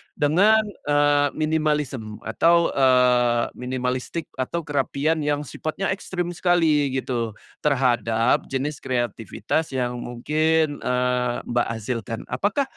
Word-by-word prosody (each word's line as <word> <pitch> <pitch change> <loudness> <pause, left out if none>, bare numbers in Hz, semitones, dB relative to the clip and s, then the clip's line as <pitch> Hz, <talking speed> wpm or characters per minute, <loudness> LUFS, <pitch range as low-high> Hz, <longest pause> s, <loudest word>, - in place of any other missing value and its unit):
dengan, 200 +9 +4 0.2
eee, 145 0 +3
minimalism 150 -8 -1
atau, 170 +4 +3
eee, 125 -2 +3
minimalistic, 125 +5 -4
atau 170 +6 -2
kerapian 145 +1 0
yang 145 -1 -1
sifatnya 155 +7 -3
ekstrem 180 -2 -3
sekali 165 -5 +2
gitu 120 -4 -2 0.2
terhadap 120 -5 +1
jenis 140 +3 -3
kreativitas 120 - -2
yang 125 -1 -1
mungkin, 155 +5 0
eee, 125 -1 0 0.2
Mbak, 120 0 +1
hasilkan? 115 0 -4
Apakah, 205 - +1
140 Hz, 105 wpm, -23 LUFS, 125-155 Hz, 0.2 s, dengan